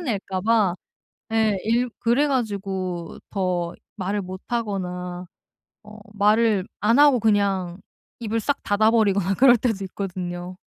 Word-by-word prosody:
낼까 200 - -3
봐 210 -4 +2 0.6
예, 220 -2 +2
일 240 +2 +1
그래 250 +6 +2
가지고 195 -8 -3
더 180 -3 -1 0.2
말을 200 +2 -2
못 185 +1 -8
하거나 180 -6 -3 0.6
어 215 0 -13
말을 210 -1 +2
안 230 +5 +3
하고 285 -4 +6
그냥 200 -5 +1 0.4
입을 225 -1 -2
싹 280 +5 -1
닫아 210 +2 +3
버리거나 200 -4 +2
그럴 250 -1 +6
때도 220 -4 -1
있거든요. 180 -1 -5
205 Hz, 235 characters per minute, -23 LUFS, 185-225 Hz, 0.6 s, 하고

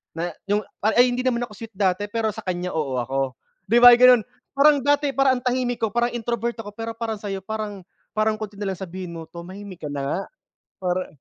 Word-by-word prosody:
na 170 +1 -2 0.2
yung 210 +1 +2 0.2
ay 220 +3 +5
ay - - +4
hindi 245 - -2
naman 240 -1 +1
ako - - -21
sweet 225 -1 -10
dati, 190 +1 +1
pero 225 -1 0
sa 220 - -9
kanya 180 -1 -2
oo 145 -5 -1
ako, 135 +1 -2 0.3
di - - +2
ba, 245 - +12
ganun. 250 -2 +7 0.3
Parang 290 +1 +6
dati 285 +1 +2
parang 270 -1 +4
ang 245 - -8
tahimik 245 -2 0
ko, 220 - +1
parang 240 +2 0
introvert 235 0 -2
ako, 205 -2 -6
pero 225 +1 -5
parang 225 -2 -3
sayo 195 -2 -5
parang 210 -2 -5 0.3
parang 215 0 +2
konti 210 -1 -6
na 200 -1 -2
lang 185 - -11
sabihin 185 -1 -6
mo, 165 -1 -8
"Tumahimik 185 +1 -10
ka - - -3
na 140 - -3
nga 150 - -1 0.6
para" 180 +1 0
215 Hz, 220 wpm, -23 LUFS, 185-240 Hz, 0.6 s, ba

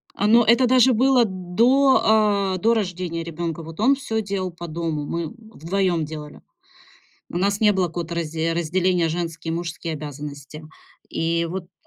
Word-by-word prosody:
Но 225 +4 +4
это 235 +3 +4
даже 255 0 +5
было 255 +1 +4
до, 210 0 +3
э, - - -4
до 230 +4 +3
рождения 180 -5 -2
ребёнка. 165 0 -5
Вот 165 +4 -11
он 265 +5 +4
всё 220 -5 -3
делал 195 -3 -3
по 170 0 -8
дому, 160 -2 -3
мы 170 0 -3
вдвоём 190 -6 -2
делали. 150 -1 -9 0.9
У 175 - -4
нас 200 +2 0
не 210 -1 +5
было 185 -2 +1
какого-то 170 0 -5
разде 165 0 -2
разделения: 175 0 +1
женские 165 -1 -4
и - - -2
мужские 170 -1 -4
обязанности. 145 0 -8 0.5
И 165 +1 0
вот 190 0 -4
так 175 - -28
175 Hz, 160 wpm, -22 LUFS, 165-210 Hz, 0.9 s, даже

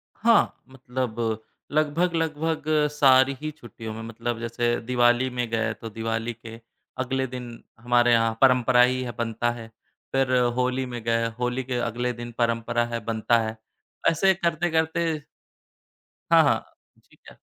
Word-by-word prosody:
हाँ, 230 0 +2
मतलब 120 -4 -3 0.3
लगभग-लगभग 160 0 0 0.3
सारी 135 -2 +5
ही 155 0 -3
छुट्टियों 115 -6 -9
में, 110 - -7
मतलब 115 +1 -4
जैसे 120 0 0
दिवाली 120 +1 +2
में 125 -1 -3
गए, 115 -1 0
तो 115 - -9
दिवाली 115 +2 -3
के 115 0 -11 0.4
अगले 130 +1 -1
दिन, 125 -2 -8 0.2
हमारे 120 0 +3
यहाँ 115 -1 +2
परंपरा 125 -1 +5
ही 130 +1 +3
है 120 - -4
बनता 120 0 -1
है। 115 -1 -8 0.5
फिर 135 -1 +2 0.2
होली 125 +1 0
में 120 -2 -6
गए, 115 0 +1
होली 125 +1 -1
के 125 -1 -3
अगले 120 +1 -2
दिन 120 0 -8
परंपरा 115 0 0
है, 120 0 -4
बनता 115 +1 +2
है, 110 0 -4 0.5
ऐसे 190 +4 +3
करते-करते 165 -2 0 1.1
हाँ, - - +8
हाँ, - - +3 0.4
ठीक - - -26
है। - - -19
120 Hz, 145 wpm, -25 LUFS, 115-135 Hz, 1.1 s, हाँ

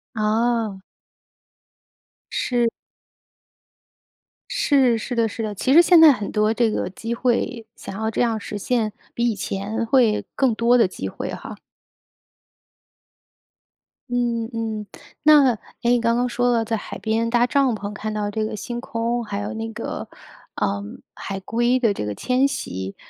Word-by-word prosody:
哦。 220 -2 0 1.5
是。 240 -2 +1 1.8
是， 260 -5 +3
是 240 +3 -4
的 230 -1 +2
是 225 +2 -5
的。 210 -1 -3
其 260 - +1
实 335 - +9
现 345 -1 +6
在 315 -2 +10
很 210 -5 -3
多 215 +1 +2
这 235 -1 +2
个 - - -2
机 225 +5 -5
会 240 -1 -1
想 - - -8
要 220 +2 -1
这 - - -1
样 230 -2 +1
实 205 0 -6
现 220 +1 0 0.2
比 235 0 +1
以 225 - -1
前 205 +4 -3
会 230 -3 +3
更 260 -4 +2
多 235 +2 +4
的 230 - +4
机 - - -6
会 - - -5
哈。 - - -7 2.5
嗯 235 -2 -1
嗯。 220 -2 -3 0.4
那， 295 -4 +6 0.3
诶， 240 - +3
你 245 - +3
刚 230 0 +2
刚 245 +1 +1
说 245 0 +1
了 230 -2 +1
在 225 +1 -1
海 210 - -6
边 225 +1 0
搭 240 0 +3
帐 270 -3 +2
篷 205 0 -6
看 215 +1 -4
到 210 -1 -2
这 215 +1 -2
个 215 - -4
星 240 +3 -5
空， 235 +1 -2
还 205 -2 -4
有 205 +2 -4
那 225 0 -4
个， 220 - -6 0.5
呃， 100 0 -1 0.3
海 195 -1 -5
龟 240 +6 +1
的 225 -5 +2
这 105 - -4
个 105 - -3
迁 255 - +2
徙， 95 - -5
230 Hz, 170 characters per minute, -22 LUFS, 215-245 Hz, 2.5 s, 在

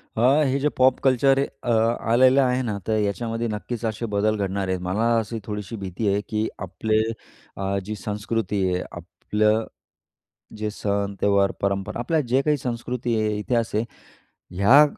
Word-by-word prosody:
हां, 130 +7 +4
हे 135 +2 +1
J 150 +2 +2
pop 130 0 +5
culture 135 +1 +4 0.2
अ, 120 - 0
आलेलं 120 +3 +4
आहे 125 -1 +2
ना. 110 -4 -2
तर 110 -1 +2
याच्यामध्ये 115 +3 -1
नक्कीच 115 +2 -4
असे 110 +1 -2
बदल 110 +2 +2
घडणार 100 -1 -2
आहेत. 95 -1 -1
मला 110 +6 +1
अशी 115 +1 -4
थोडीशी 105 0 -5
भीती 95 +2 -3
आहे 100 +1 +2
की 110 0 0 0.2
आपले 110 +4 0 0.6
अ, 95 0 -1
जी 110 +1 -4
संस्कृती 105 -1 -2
आहे, 90 - -1
आपलं 110 +1 0 0.9
जे 105 0 -2
सण, 100 -1 -2
त्योहार, 100 -1 +3
परंपरा, 100 +2 -1
आपल्या 155 +7 +1
जे 130 +2 +4
काही 150 +1 +1
संस्कृती 120 -1 -3
आहे, 105 -1 0
इतिहास 115 +1 0
आहे. 110 - +2 0.8
ह्या 125 +10 +7
110 Hz, 160 wpm, -24 LUFS, 100-120 Hz, 0.9 s, ह्या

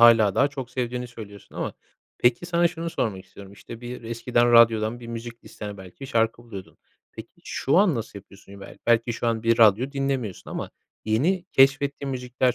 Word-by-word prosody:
hâlâ 115 -4 +7
daha 140 - +3
çok 135 -3 -7
sevdiğini 125 -1 -3
söylüyorsun 105 -4 -12
ama - - -3 0.4
peki, 120 +8 +2
sana 170 0 +3
şunu 170 0 -5
sormak 100 -10 -2
istiyorum: 95 +1 -13
İşte, 115 +3 -11
bir 125 0 -7
eskiden 120 +1 +1
radyodan 115 0 +5
bir 120 - -9
müzik 115 0 -8
listene 105 -1 -8
belki 95 +8 -10
şarkı 115 -1 0
buluyordun. 100 -6 -10 0.3
Peki, - - -10
şu 135 - 0
an 195 -5 +4
nasıl 115 -3 -5
yapıyorsun? 100 0 -15
Be - - -11
belki 115 0 +3
şu 120 - -3
an 115 -1 0
bir 115 0 +2
radyo 115 +5 +5
dinlemiyorsun 135 -8 -3
ama - - -5 0.3
yeni 155 - +1
keşfettiğin 140 +1 +3
müzikler 125 0 0
120 Hz, 175 wpm, -25 LUFS, 110-130 Hz, 0.4 s, hâlâ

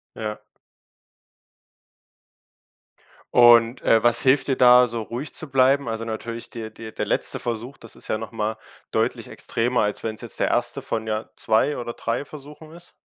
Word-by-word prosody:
Ja. 105 -1 -5 2.9
Und, 120 0 +6
äh, 110 -1 +3
was 120 0 +3
hilft 135 +1 +3
dir, 135 - +1
da 125 0 +7
so 115 -1 -4
ruhig 120 +6 -6
zu 155 - -7
bleiben? 135 0 +3
Also, 115 0 -3
natürlich 115 +1 -6
der 115 -2 -6
der 110 0 -10
der - - -3
letzte - - +1
Versuch, 120 +3 -5
das 115 - -14
ist - - -14
ja 110 - 0
noch 110 - -7
mal 110 -1 -3 0.3
deutlich - - -1
extremer, 120 +2 -1
als 105 - -3
wenn's 110 -1 -4
jetzt - - -6
der - - +1
1. - - -1
von 110 0 -3
ja 110 0 -3
2 110 +7 +1
oder 120 -1 -5
3 115 +5 -3
Versuchen 150 +2 -12
ist. 175 +1 -14
115 Hz, 170 wpm, -23 LUFS, 110-130 Hz, 2.9 s, da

